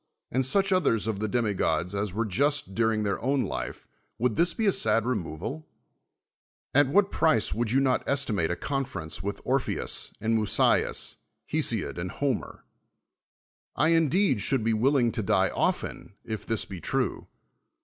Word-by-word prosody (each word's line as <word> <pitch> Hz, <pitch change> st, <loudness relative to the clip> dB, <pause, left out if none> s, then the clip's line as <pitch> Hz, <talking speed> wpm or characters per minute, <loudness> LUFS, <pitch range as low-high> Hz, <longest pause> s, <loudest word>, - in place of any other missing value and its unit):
and 130 Hz, +1 st, +1 dB
such 195 Hz, +6 st, +2 dB
others 140 Hz, -, +2 dB
of 110 Hz, -3 st, -2 dB
the 110 Hz, -, -1 dB
demigods 100 Hz, -7 st, 0 dB
as 100 Hz, 0 st, -2 dB
were 115 Hz, +5 st, -1 dB
ju.st 135 Hz, 0 st, 0 dB
during 110 Hz, 0 st, +1 dB
their 100 Hz, -2 st, -2 dB
own 135 Hz, +2 st, +1 dB
life, -, -, -5 dB, 0.3 s
would 120 Hz, -2 st, 0 dB
this 170 Hz, +1 st, +3 dB
be 225 Hz, -, -2 dB
a 200 Hz, -, +5 dB
sad 150 Hz, -, +2 dB
I'onoval? 110 Hz, -, -4 dB, 1.1 s
At 145 Hz, 0 st, +5 dB
what 200 Hz, +7 st, +3 dB
price 155 Hz, -9 st, +2 dB
would 115 Hz, 0 st, -1 dB
you 130 Hz, +4 st, +3 dB
not 130 Hz, -2 st, +2 dB
esti 140 Hz, -4 st, +1 dB
Hiate 85 Hz, -5 st, 0 dB
a 85 Hz, -, -1 dB
conference 90 Hz, -, -4 dB
with 100 Hz, +1 st, -4 dB
Orpheus 130 Hz, +1 st, -1 dB
and 115 Hz, 0 st, 0 dB
Musteus, 105 Hz, -, +2 dB, 0.3 s
Ilesiod -, -, +1 dB
aiid 90 Hz, +1 st, -3 dB
Iloriier? 140 Hz, -5 st, -2 dB, 1.1 s
1 155 Hz, +5 st, +3 dB
indeed 165 Hz, -, +3 dB
should 130 Hz, +3 st, +1 dB
be 115 Hz, 0 st, +1 dB
willing 120 Hz, +1 st, +2 dB
to 110 Hz, -, -1 dB
dit' 95 Hz, -, +2 dB
often, 100 Hz, -, -2 dB
if 110 Hz, -1 st, -6 dB
this 115 Hz, -2 st, 0 dB
be 95 Hz, -4 st, -9 dB
true. -, -, -2 dB
115 Hz, 160 wpm, -27 LUFS, 105-140 Hz, 1.1 s, a